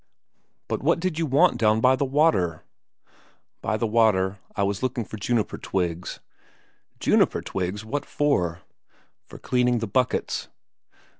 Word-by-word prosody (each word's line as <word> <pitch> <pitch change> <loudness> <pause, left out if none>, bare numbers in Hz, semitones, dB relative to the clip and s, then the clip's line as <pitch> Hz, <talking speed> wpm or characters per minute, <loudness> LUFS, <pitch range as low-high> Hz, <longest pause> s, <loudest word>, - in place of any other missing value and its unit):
"But - - -2
what - - +2
did 170 -2 -2
you 165 - 0
want 150 +7 +3
down 110 -1 +3
by 130 +3 +4
the 140 - 0
water?" 130 - +2 1.0
"By 110 - -1
the 115 - -1
water? 105 -4 +2 0.2
I 100 - 0
was 100 0 -1
looking 125 -3 -2
for 110 - -8
juniper 110 +1 -1
twigs." 90 -2 -3 0.8
"Juniper - - +2
twigs? 95 +3 -3
What 140 +6 -3
for?" 95 - 0 0.7
"For - - -11
cleaning 125 -1 +1
the 115 - -2
buckets." 125 +5 -1
110 Hz, 140 wpm, -25 LUFS, 95-130 Hz, 1.0 s, by